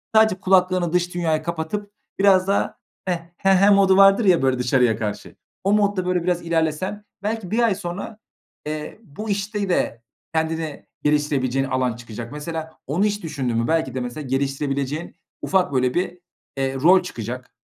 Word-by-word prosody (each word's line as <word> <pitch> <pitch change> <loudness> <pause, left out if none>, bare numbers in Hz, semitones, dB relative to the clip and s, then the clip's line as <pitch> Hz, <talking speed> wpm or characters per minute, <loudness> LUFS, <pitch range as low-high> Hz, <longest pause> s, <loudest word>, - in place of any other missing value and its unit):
sadece 220 -4 +5
kulaklarını 185 -2 +2
dış 175 0 0
dünyaya 160 -3 0
kapatıp 170 +5 -4 0.3
biraz 195 -1 +5
daha, 200 - 0 0.3
"heh, 180 -2 0 0.2
he 195 -1 +3
he" 195 +2 +5
modu 195 -1 +5
vardır 195 +3 +6
ya 180 -3 +5
böyle 130 -1 +1
dışarıya 125 -3 +2
karşı, 105 -2 -5 0.3
o 195 - +2
modda 205 -3 +2
böyle 180 -1 0
biraz 180 -1 0
ilerlesen, 170 +5 -1 0.2
belki 215 -3 -3
1 225 - +1
ay 230 -4 +3
sonra, 200 +3 -6 0.5
eee, 155 +6 -5
bu 210 +5 -8
işte 200 0 -2
de 120 -9 0 0.3
kendini 160 -1 -2 0.2
geliştirebileceğin 140 -3 +1
alan 130 -2 0
çıkacak. 115 0 -8
Mesela, 160 +2 -5 0.2
onu 175 +9 +1
hiç 205 -2 -1
düşündün 135 -7 -2
mü, 115 0 0
belki 160 -4 0
de, 130 - -1
mesela, 125 +4 -5
geliştirebileceğin 135 +3 -2 0.3
ufak 185 -7 +1
böyle 125 -1 +2
bir, 180 0 -1 0.4
eee, 135 0 -1
rol 175 +8 +5
çıkacak. 125 -5 -6
165 Hz, 165 wpm, -22 LUFS, 135-195 Hz, 0.5 s, vardır